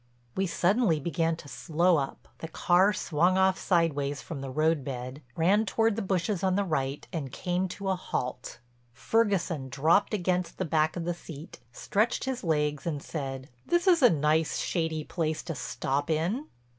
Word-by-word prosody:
We 190 0 0
suddenly 180 0 +2
began 165 +2 0
to 160 - -12
slow 170 +3 +1
up, 135 -1 -4
the 160 - -5
car 180 +4 +3
swung 180 -2 +1
off 190 0 +3
sideways 145 -5 +1
from 145 -2 -7
the 135 - -5
roadbed, 140 -3 -1
ran 195 +6 +3
toward 225 0 +1
the 225 - -2
bushes 190 0 -1
on 185 -1 +2
the 200 - +2
right, 140 -6 -2
and 145 -6 -4
came 180 +4 -1
to 195 +2 -6
a 190 - +2
halt. 125 -8 -4 0.4
Ferguson 185 - 0
dropped 160 - +2
against 180 -2 -1
the 185 - -1
back 155 -1 +1
of 170 -2 -3
the 175 - 0
seat, 160 -2 -10
stretched 210 - 0
his 265 -1 -3
legs 150 -3 0
and 150 -4 -3
said: 135 -4 -5 0.2
"This 345 +1 +2
is 350 -4 +5
a 245 - +8
nice 155 0 +1
shady 160 -3 -1
place 155 -1 -2
to 165 - -4
stop 140 +2 -2
in." 175 - 0
165 Hz, 170 wpm, -28 LUFS, 150-190 Hz, 0.4 s, a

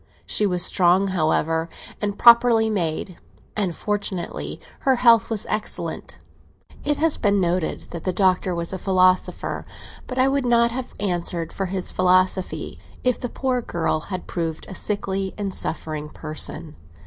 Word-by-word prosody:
She 210 - +1
was 180 -2 +4
strong, 185 +2 +4
however, 160 -1 0 0.3
and 205 -1 -2
properly 235 -2 +6
made, 175 -2 -2 0.4
and, 190 -5 -1
fortunately, 205 -4 -3 0.2
her 265 -1 +2
health 235 -3 +5
was 220 -2 0
excellent. 215 - -4 0.7
It 295 0 0
has 320 0 +3
been 205 -2 +2
noted 175 -2 -1
that 170 - -6
the 185 - 0
Doctor 185 -1 +1
was 170 +2 -4
a 190 - -4
philosopher, 185 -1 +1 0.4
but 255 - -6
I 260 +1 +4
would 275 0 +1
not 235 -1 +3
have 255 +1 -6
answered 175 -4 -1
for 195 - -2
his 185 0 0
philosophy 185 0 +1 0.2
if 250 -1 +1
the 245 - -4
poor 255 -1 -1
girl 165 -7 -1
had 185 +2 -6
proved 165 -2 -4
a - - -8
sickly 195 -1 -2
and 200 -2 -3
suffering 155 -3 -3
person. 155 0 -4
190 Hz, 150 wpm, -23 LUFS, 175-220 Hz, 0.7 s, properly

